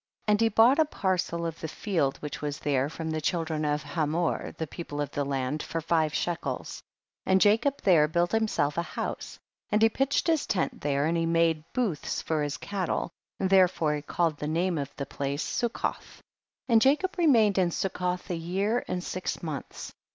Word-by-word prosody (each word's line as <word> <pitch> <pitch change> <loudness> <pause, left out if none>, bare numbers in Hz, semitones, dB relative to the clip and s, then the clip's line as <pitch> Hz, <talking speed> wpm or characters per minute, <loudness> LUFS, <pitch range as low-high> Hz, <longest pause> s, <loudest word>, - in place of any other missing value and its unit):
2. 210 - +2
And 210 +1 +3
he 225 - +4
bought 230 +7 +5
a 315 - +6
parcel 185 - -1
of 165 -1 -4
the 160 - -4
field 160 -6 -1
which 150 - -5
was 145 -1 -3
there, 140 -1 0
from 160 0 -5
the 155 0 -2
child 165 +1 -1
ren 155 -1 -1
of 150 0 0
Hamor 155 +2 -1
the 160 - -4
people 145 -2 -7
of 145 -1 -2
the 145 - -1
land, 135 +1 -2
for 165 - -3
five 160 -1 +1
shekels. 175 +2 -3 0.5
3. - - -1
And 190 - +6
Jacob 225 +8 +3
there 165 -6 +5
built 170 +2 +1
himself 210 -9 +1
a - - +2
house, 170 - -5 0.3
and 210 - +2
he 225 - +7
pitched 270 +5 0
his 320 -3 +1
tent 185 -5 -1
there, 140 0 +1
and 165 +2 +1
he 165 0 +1
made 165 -2 +2
booths 215 - -1
for 155 -2 -1
his 145 -1 -2
cattle, 195 -3 -2 0.3
therefore 185 -5 +3
he 150 - -3
called 160 +1 0
the 150 - -3
name 170 +1 0
of 140 -1 -4
that 140 - -5
place 140 +2 -2
Succoth, 240 -1 -2
4. - - -21 0.5
And 225 -2 +6
Jacob 300 - +3
remained 225 - +4
in 180 -2 +3
Suc 190 +2 -2
coth 180 0 -2
a - - 0
year 195 +8 -1
and 180 -1 -3
six 185 -1 -4
months. 155 -4 -6
170 Hz, 205 wpm, -28 LUFS, 150-200 Hz, 0.5 s, he